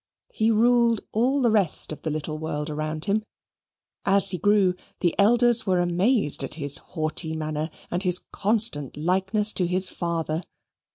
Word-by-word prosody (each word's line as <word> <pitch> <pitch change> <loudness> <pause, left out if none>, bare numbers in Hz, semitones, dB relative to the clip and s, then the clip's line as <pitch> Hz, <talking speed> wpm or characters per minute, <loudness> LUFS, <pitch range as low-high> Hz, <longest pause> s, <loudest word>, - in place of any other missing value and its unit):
He 220 +1 +1
ruled 235 0 +3
all 255 +6 +1
the 235 - +3
rest 200 -9 0
of 150 -1 -8
the 160 - -3
little 155 0 -4
world 150 -1 -4
round 155 +1 -4
about - - 0
him. 210 +2 0 0.8
As 195 -1 +3
he 180 - -3
grew, 205 -1 +3 0.3
the 175 -2 +1
elders 235 +2 +4
were 185 -1 +2
amazed 175 - +1
at 135 - -4
his 145 -3 -2
haughty 160 0 -2
manner 155 0 -3 0.2
and 175 - -1
his 180 -2 +6
constant 205 - 0
likeness 190 +6 +1
to 180 - 0
his 185 +1 0
father. 165 -2 -3
180 Hz, 165 wpm, -24 LUFS, 155-215 Hz, 0.8 s, his